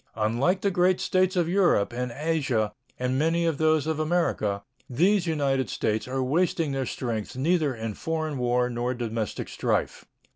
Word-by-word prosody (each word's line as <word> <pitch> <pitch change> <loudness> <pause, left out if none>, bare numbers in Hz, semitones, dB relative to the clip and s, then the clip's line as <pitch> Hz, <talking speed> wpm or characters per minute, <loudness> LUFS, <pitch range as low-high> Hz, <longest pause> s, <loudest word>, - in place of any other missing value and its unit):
Unlike 120 - +1
the 200 - +1
great 180 0 +3
States 185 0 +1
of 175 -3 +2
Europe 175 - +2
and 125 0 -3
Asia 135 -9 0 0.2
and 125 +1 -1
many 165 +2 +2
of 160 -4 0
those 155 -1 +3
of 160 -1 -1
America, 155 - 0 0.3
these 180 +8 +2
United 135 -6 0
States 110 +4 -1
are 130 +1 -1
wasting 160 +2 +1
their 135 -2 -2
strength 115 -4 -4
neither 150 0 +1
in 110 -1 -4
foreign 155 +1 -3
war 125 0 +2
nor 120 +1 -2
domestic 115 -3 -3
strife. - - -1
140 Hz, 160 wpm, -26 LUFS, 120-165 Hz, 0.3 s, great